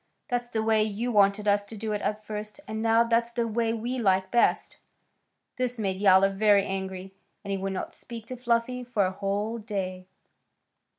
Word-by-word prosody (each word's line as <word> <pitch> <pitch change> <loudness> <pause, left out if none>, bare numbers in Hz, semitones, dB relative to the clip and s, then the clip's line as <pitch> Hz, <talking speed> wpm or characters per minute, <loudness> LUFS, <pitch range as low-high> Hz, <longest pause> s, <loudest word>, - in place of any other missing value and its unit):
That's 245 -1 -1
the 220 -2 -1
way 220 -1 +3
you 220 +3 -2
wanted 205 0 +3
us 205 0 +3
to 220 +2 -10
do 215 +1 -3
it 210 -1 -1
at 215 0 -2
first, 210 +3 -6
and 220 0 -4
now 225 +1 +4
that's 235 0 +1
the 235 -1 -1
way 225 0 0
we 235 +3 -3
like 190 -3 +2
best." 240 - +2 0.8
This 250 -1 -1
made 195 -3 -2
Yowler 195 -1 +6
very 200 0 +4
angry, 190 -1 -5 0.3
and 200 - -5
he 195 - 0
would 195 0 -2
not 190 - -4
speak 230 -2 -9
to 255 - -6
Fluffy 245 +1 0
for 235 -5 +1
a 185 - -1
whole 205 +4 -2
day. 185 -4 -4
215 Hz, 190 wpm, -27 LUFS, 195-230 Hz, 0.8 s, Yowler